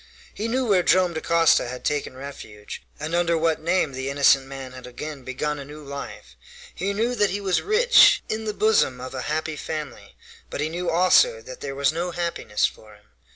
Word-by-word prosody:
He 215 Hz, -, -3 dB
knew 255 Hz, +3 st, 0 dB
where 200 Hz, -5 st, +3 dB
Joam 180 Hz, 0 st, +3 dB
Dacosta 165 Hz, -3 st, +3 dB
had 125 Hz, +1 st, -7 dB
taken 145 Hz, -3 st, -2 dB
refuge, 110 Hz, -7 st, -9 dB, 0.2 s
and 155 Hz, +3 st, -5 dB
under 170 Hz, -1 st, +2 dB
what 160 Hz, -1 st, 0 dB
name 170 Hz, -2 st, +1 dB
the 130 Hz, +1 st, -4 dB
innocent 140 Hz, -1 st, +4 dB
man 135 Hz, -1 st, -8 dB
had 125 Hz, 0 st, -10 dB
again 145 Hz, +3 st, -7 dB
begun 145 Hz, +4 st, -3 dB
a -, -, -6 dB
new 150 Hz, +2 st, -11 dB
life. 140 Hz, -, -8 dB, 0.4 s
He 195 Hz, +4 st, -2 dB
knew 225 Hz, +5 st, 0 dB
that 210 Hz, -4 st, +2 dB
he 200 Hz, -, -2 dB
was 190 Hz, -3 st, 0 dB
rich, 470 Hz, +4 st, +5 dB
in 220 Hz, 0 st, -3 dB
the 215 Hz, -, -2 dB
bosom 210 Hz, -13 st, +2 dB
of 130 Hz, +1 st, -7 dB
a 130 Hz, -, -4 dB
happy 155 Hz, +3 st, -2 dB
family, 150 Hz, -3 st, -7 dB, 0.3 s
but -, -, -6 dB
he 150 Hz, +2 st, -1 dB
knew 175 Hz, +2 st, -3 dB
also 185 Hz, -, +4 dB
that -, -, -10 dB
there 135 Hz, -, -5 dB
was 140 Hz, +2 st, +1 dB
no 170 Hz, +2 st, -2 dB
happiness 170 Hz, -12 st, -1 dB
for 110 Hz, -1 st, -7 dB
him. 105 Hz, -, -23 dB
155 Hz, 200 wpm, -24 LUFS, 135-185 Hz, 0.4 s, rich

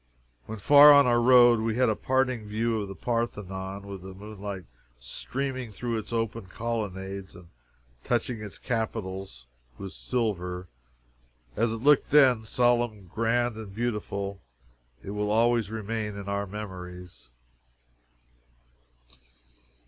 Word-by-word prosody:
When 110 Hz, -, -6 dB
far 145 Hz, +7 st, +8 dB
on 140 Hz, 0 st, +7 dB
our 120 Hz, -1 st, +3 dB
road, 120 Hz, -1 st, +7 dB
we 110 Hz, 0 st, -1 dB
had 125 Hz, +1 st, +3 dB
a 110 Hz, -, +2 dB
parting 130 Hz, -4 st, 0 dB
view 110 Hz, +1 st, -1 dB
of 100 Hz, -, -4 dB
the 95 Hz, -, -8 dB
Parthenon, 100 Hz, -4 st, -3 dB
with 100 Hz, -2 st, -8 dB
the 95 Hz, 0 st, -10 dB
moonlight 100 Hz, -1 st, -7 dB, 0.4 s
streaming 130 Hz, -, -4 dB
through 115 Hz, +2 st, -3 dB
its 110 Hz, -, -9 dB
open 115 Hz, -2 st, -2 dB
colonnades 100 Hz, -3 st, -4 dB
and 90 Hz, -1 st, -14 dB, 0.5 s
touching 120 Hz, -1 st, -1 dB
its 105 Hz, -2 st, -7 dB
capitals 95 Hz, -, -4 dB, 0.3 s
with 95 Hz, -1 st, -7 dB
silver. 90 Hz, -8 st, -2 dB, 0.9 s
As 115 Hz, +1 st, +1 dB
it 115 Hz, +1 st, -5 dB
looked 145 Hz, -1 st, +4 dB
then, 130 Hz, -6 st, +5 dB
solemn, 120 Hz, -3 st, +1 dB
grand, 115 Hz, +1 st, +1 dB
and 105 Hz, -3 st, -9 dB
beautiful 105 Hz, -4 st, -3 dB, 0.6 s
it 100 Hz, -, -6 dB
will 105 Hz, 0 st, -2 dB
always 115 Hz, 0 st, +2 dB
remain 110 Hz, -1 st, -4 dB
in 100 Hz, -1 st, -7 dB
our 100 Hz, 0 st, -2 dB
memories. 90 Hz, -, -9 dB
110 Hz, 125 wpm, -27 LUFS, 100-120 Hz, 0.9 s, far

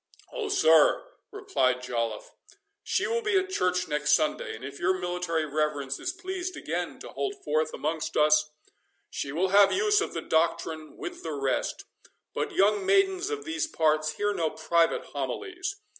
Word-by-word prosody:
"Oh, 455 Hz, -4 st, -3 dB
sir," 160 Hz, -, +5 dB, 0.2 s
replied 380 Hz, -, 0 dB
Joliffe, 115 Hz, -3 st, -3 dB, 0.5 s
"she -, -, 0 dB
will 465 Hz, +1 st, 0 dB
be 425 Hz, -3 st, +2 dB
at 380 Hz, 0 st, 0 dB
church 180 Hz, -, 0 dB
next 150 Hz, 0 st, +1 dB
Sunday, 155 Hz, -6 st, +1 dB
and 115 Hz, +4 st, -9 dB
if 140 Hz, 0 st, -8 dB
your 185 Hz, +2 st, +2 dB
military 175 Hz, -3 st, -1 dB
reverence 145 Hz, -2 st, -1 dB
is 360 Hz, -, -2 dB
pleased 375 Hz, -1 st, -5 dB
again -, -, -3 dB
to -, -, -8 dB
hold 400 Hz, 0 st, -3 dB
forth 155 Hz, +1 st, 0 dB
amongst 155 Hz, +1 st, -3 dB
us, 150 Hz, 0 st, +4 dB, 0.6 s
she 140 Hz, -, -4 dB
will 180 Hz, +6 st, 0 dB
have 200 Hz, +1 st, +6 dB
use 420 Hz, +1 st, +3 dB
of -, -, -3 dB
the -, -, -2 dB
doctrine 160 Hz, -1 st, -1 dB
with 360 Hz, -2 st, -7 dB
the 160 Hz, -, -4 dB
rest. 135 Hz, -2 st, -2 dB, 0.5 s
But -, -, -2 dB
young 205 Hz, -, +3 dB
maidens 385 Hz, 0 st, +2 dB
of 430 Hz, -1 st, -4 dB
these 325 Hz, 0 st, -1 dB
parts 155 Hz, -, +1 dB
hear 205 Hz, +6 st, 0 dB
no 165 Hz, -5 st, 0 dB
private 165 Hz, +2 st, +1 dB
homilies. 380 Hz, -1 st, -4 dB
180 Hz, 165 wpm, -27 LUFS, -, 0.6 s, have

